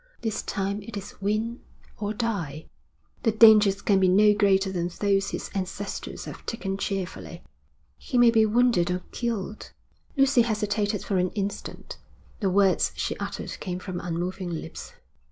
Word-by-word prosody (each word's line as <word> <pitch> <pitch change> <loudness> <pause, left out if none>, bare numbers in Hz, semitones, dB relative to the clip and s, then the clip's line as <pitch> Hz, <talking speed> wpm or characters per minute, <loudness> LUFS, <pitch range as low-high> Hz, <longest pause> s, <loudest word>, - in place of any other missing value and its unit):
This 220 -2 -2
time 200 +1 -2
it 205 +1 -8
is 200 0 -9
win 215 +4 -1 0.4
or 205 -1 -2
die.' 200 -10 -3 0.6
'The 225 - +2
dangers 215 -3 +6
can 195 -2 +3
be 190 - +4
no 210 +3 +6
greater 195 -2 +3
than 175 -2 -1
those 195 -1 +2
his - - -5
ancestors 195 +1 -5
have - - -9
taken 195 -4 -3
cheerfully.' 190 -3 -4 0.6
'He 250 - -2
may 240 -1 +7
be 225 -1 +5
wounded 230 -6 +3
or 180 0 -2
killed.' 220 -3 -4 0.5
Lucy 275 -2 +5
hesitated 210 -2 0
for 195 - -1
an 180 0 +2
instant. 200 0 -5 0.4
The 195 - +1
words 195 0 +3
she - - -2
uttered - - -5
came 180 -2 -4
from 185 -1 -5
unmoving 175 +2 -3
lips. 165 -2 -7
200 Hz, 155 wpm, -26 LUFS, 185-215 Hz, 0.6 s, may